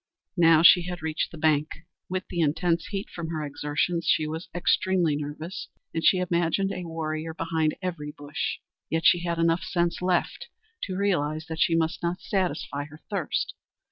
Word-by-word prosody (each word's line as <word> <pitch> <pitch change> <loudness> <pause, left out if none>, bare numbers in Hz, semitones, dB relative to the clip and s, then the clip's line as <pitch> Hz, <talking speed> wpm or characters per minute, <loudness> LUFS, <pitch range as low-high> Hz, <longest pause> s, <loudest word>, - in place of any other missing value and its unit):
Now 165 -2 +6
she 180 +1 +9
had 180 -2 -5
reached 160 -1 -1
the 165 - -10
bank. 155 -1 +2 0.4
With 185 +1 -3
the 175 - -3
intense 165 +2 +1
heat 200 0 -4
from 170 -2 -6
her 155 -2 -3
exertions, 150 +4 -1
she 155 - +3
was 160 +3 -5
extremely 175 -2 +2
nervous, 150 +5 -5 0.3
and 165 - -2
she 185 - +6
imagined 180 +1 +1
a 180 -2 -4
warrior 160 -1 -4
behind 160 -2 0
every 165 -5 -3
bush. 145 -1 -4 0.3
Yet 160 0 -1
she 175 - +7
had 170 -1 -2
enough 165 +1 +2
sense 170 -1 -1
left 180 - 0 0.4
to 185 -1 -4
realize 155 -6 0
that 160 0 -4
she 165 - +3
must 165 +1 0
not 175 +1 -1
satisfy 180 -7 -2
her 150 +1 -14
thirst. 190 -7 -1
165 Hz, 175 wpm, -26 LUFS, 155-180 Hz, 0.4 s, she